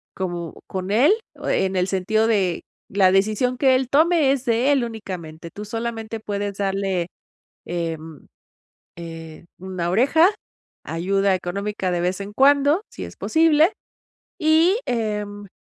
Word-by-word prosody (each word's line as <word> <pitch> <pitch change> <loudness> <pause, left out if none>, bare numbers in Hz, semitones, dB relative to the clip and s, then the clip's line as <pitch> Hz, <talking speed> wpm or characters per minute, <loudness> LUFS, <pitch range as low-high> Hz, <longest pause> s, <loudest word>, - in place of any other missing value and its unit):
como 175 -3 -5
con 190 0 -4
él, 255 - +5 0.2
en 190 0 -1
el 180 +1 +1
sentido 215 +4 +1
de 195 -6 +1 0.3
la 190 -2 +4
decisión 215 +6 +1
que 265 -1 +4
él 255 -1 0
tome 310 -1 +4
es 265 -2 -3
de 240 +4 +2
él 265 -3 +2
únicamente, 180 -8 -7
tú, 210 - -8
solamente, 225 0 -4
puedes 205 -1 -4
darle, 195 -3 -1 0.6
em, 165 -3 -5 0.7
eh, 165 -1 -9 0.2
una 185 -2 -4
oreja, 280 - +4 0.6
ayuda 195 +4 +1
económica 195 +2 -3
de 175 - 0
vez 180 +3 -1
en 200 +1 -6
cuando, 285 - +4
si - - -7
es - - -9
posible. 320 +2 +3 0.7
Y, 325 +4 +4
em, 210 -3 -3
205 Hz, 135 wpm, -22 LUFS, 185-250 Hz, 0.7 s, él